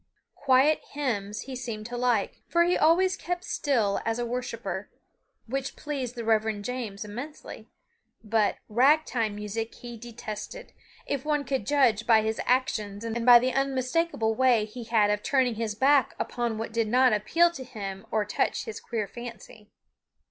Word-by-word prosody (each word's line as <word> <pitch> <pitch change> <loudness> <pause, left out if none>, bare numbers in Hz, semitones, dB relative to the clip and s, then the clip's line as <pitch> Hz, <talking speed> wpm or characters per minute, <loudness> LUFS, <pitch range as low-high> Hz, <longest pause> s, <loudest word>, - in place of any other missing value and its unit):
Quiet 275 +3 +3
hymns 215 -7 -2
he 265 0 -7
seemed 230 -4 -5
to 245 +2 -6
like, 240 -4 0
for 340 0 +3
he 355 +1 +2
always 370 +4 +4
kept 355 0 -4
still 230 - 0
as 225 0 -1
a 240 - -1
worshiper, 230 -6 -4 0.6
which 270 +3 -3
pleased 270 -5 -4
the 235 -2 -5
Reverend 220 -2 +1
James 225 -5 -4
immensely, 250 +9 -8 0.5
but 215 -1 +1
"rag 280 +8 +4
time" 225 -4 -1
music 210 +2 -4
he 240 -1 -9
detested, 230 - -8 0.3
if 275 -2 -2
one 300 -1 0
could 260 -6 -2
judge 250 -7 +3
by 220 -2 +5
his 220 0 -1
actions 215 -5 0
and 230 +1 -3
by 245 -1 +11
the 255 +1 +1
unmistakable 270 -2 0
way 240 -2 +3
he 230 +2 -9
had 220 -3 +3
of 210 0 -1
turning 260 -2 +2
his 220 -1 -3
back 270 +2 +3
upon 240 -2 -2
what 225 0 -5
did 230 -1 +1
not 250 +1 +4
appeal 330 +12 +3
to 270 -6 -7
him 200 -6 -7
or 215 -1 0
touch - - -1
his 450 - -6
queer 220 -3 -3
fancy. 230 -1 -10
235 Hz, 165 wpm, -27 LUFS, 215-265 Hz, 0.6 s, by